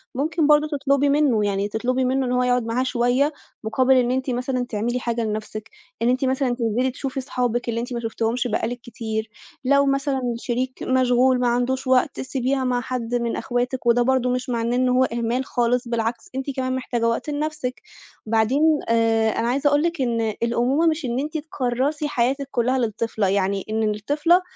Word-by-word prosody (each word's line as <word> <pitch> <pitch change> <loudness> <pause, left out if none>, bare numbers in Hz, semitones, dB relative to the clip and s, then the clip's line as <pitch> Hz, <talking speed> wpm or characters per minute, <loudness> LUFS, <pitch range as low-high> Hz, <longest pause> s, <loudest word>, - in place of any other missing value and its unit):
ممكن 305 +3 +1
برضه 300 0 +5
تطلبي 280 -1 +1
منه، 275 -8 +3
يعني 200 0 0
تطلبي 250 +5 -1
منه 265 +1 +1
إن 250 - -2
هو 250 0 +2
يقعد 250 -1 +2
معاها 235 +3 0
شوية، 255 +4 +1 0.3
مقابل 255 +4 +3
إن 250 -1 +3
أنتِ 260 +1 -1
مثلًا 250 0 -1
تعملي 235 +3 -1
حاجة 235 -1 -2
لنفسِك، 215 0 -4 0.3
إن 235 - +3
أنتِ 255 +2 +1
مثلًا 260 -1 0
تنزلي 240 +2 0
تشوفِي 265 +1 -4
صحابِك 245 -2 -2
اللي 230 - -1
أنتِ 245 +1 -4
ما 235 - -2
شُفتِهمش 230 +2 -1
بقى 225 0 -1
لِك 245 +1 -5
كتير، 220 -1 -4 0.4
لو 280 +1 +4
مثلًا 275 -1 0
الشريك 255 +2 -3
مشغول، 255 0 +3
ما 245 - +1
عندوش 255 +2 0
وقت، 260 +1 +2
سيبيها 265 0 -1
مع 250 -1 0
حد 245 -2 -3
من 235 -1 -1
أخواتِك، 250 0 -2
وده 240 +1 +4
برضه 255 0 +2
مش 250 0 -2
معناه 235 0 0
إن 255 0 +2
هو 250 +1 +4
إهمال 240 +1 -1
خالص، 245 0 0
بالعكس 230 0 -2
أنتِ 270 +1 -3
كمان 255 -1 -1
محتاجة 240 -3 -1
وقت 230 +6 -1
لنفْسِك. 295 -3 -3 0.4
بعدين 260 +8 +3
آآ 225 -1 +3
أنا 230 - 0
عايزة 275 +4 +1
أقول 290 +1 +3
لِك 340 -3 -1
إن 230 -3 0
الأمومة 250 +7 +2
مش 315 -3 0
إن 240 +1 -1
أنتِ 305 +2 -3
تكرّسي 290 0 -1
حياتِك 270 +1 0
كلها 250 +2 +1
للطفلة، 225 -3 -1
يعني 195 0 0
إن 220 0 0
الطفلة 290 - +2
250 Hz, 185 wpm, -23 LUFS, 235-265 Hz, 0.4 s, برضه